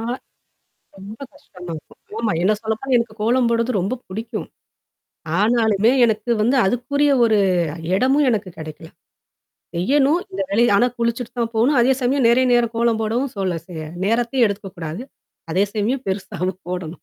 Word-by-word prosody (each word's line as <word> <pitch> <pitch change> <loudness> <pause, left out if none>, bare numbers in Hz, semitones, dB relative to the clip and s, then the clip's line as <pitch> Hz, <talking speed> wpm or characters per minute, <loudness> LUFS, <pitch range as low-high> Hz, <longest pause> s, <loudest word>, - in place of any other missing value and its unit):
ஆ - - -5 1.0
ரொம்ப 200 +3 -10
கஷ்டமா 180 -11 -13
இருக்கும். 155 - -13 0.2
ஆமா. 225 -4 0
என்ன 210 +3 +4
சொல்லப்போனா 225 +4 -1
எனக்கு 235 -2 -2
கோலம் 240 +2 +2
போடுறது 230 +2 +1
ரொம்ப 210 +8 -1
பிடிக்கும். 220 +4 -5 0.9
ஆனாலுமே 220 0 +3
எனக்கு 220 +1 -1
வந்து 245 +5 +2
அதுக்குரிய 280 +6 +1
ஒரு 220 -2 +3 0.6
இடமும் 270 +7 +3
எனக்கு 210 -4 -1
கிடைக்கல, 160 +1 -9 0.9
செய்யணும். 280 - +2
இந்த 195 - -5
வேலைய 230 +1 +3
ஆனா 245 - +4
குளிச்சுட்டு 235 +1 -2
தான் 230 0 -1
போணும். 255 +6 +3
அதே 250 +3 +4
சமயம் 250 0 +2
நெறைய 255 +2 +4
நேரம் 240 -1 +2
கோலம் 230 -1 +1
போடவும் 240 +5 -1
சொல்ல 185 -3 -1
சே 180 - -11 0.3
நேரத்தையும் 235 +3 +2
எடுத்துக்கக்கூடாது. 195 -3 -5 0.5
அதே 190 +4 +3
சமயம் 235 +5 -1
பெருசாவும் 190 -2 -3
போடணும். 180 -2 -5
225 Hz, 145 wpm, -21 LUFS, 195-245 Hz, 1.0 s, என்ன